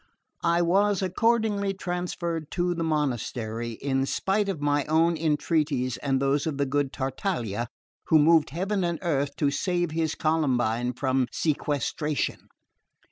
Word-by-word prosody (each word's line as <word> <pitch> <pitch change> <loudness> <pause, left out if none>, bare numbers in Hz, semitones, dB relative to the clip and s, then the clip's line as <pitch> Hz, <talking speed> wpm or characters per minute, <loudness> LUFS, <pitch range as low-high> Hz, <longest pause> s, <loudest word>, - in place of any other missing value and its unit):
I 170 +1 +3
was 195 +3 +2
accordingly 205 0 +1
transferred 175 -3 -3
to 175 0 +1
the 165 -1 -2
monastery, 120 -6 -2
in 135 +2 -1
spite 200 +5 0
of 185 -6 -2
my 145 0 +1
own 165 +2 +3
entreaties 150 -5 0
and 135 -2 0
those 140 +3 +1
of 150 -3 -2
the 140 - +1
good 140 0 0
Tartaglia, 130 - -2 0.4
who 160 - +5
moved 160 +1 +5
heaven 190 +6 -1
and 170 -1 0
earth 140 -4 0
to 145 -2 +1
save 175 +1 0
his 160 -1 -1
Columbine 125 -6 +1
from 130 0 0
sequestration. 150 -1 -1
155 Hz, 135 wpm, -26 LUFS, 135-175 Hz, 0.4 s, who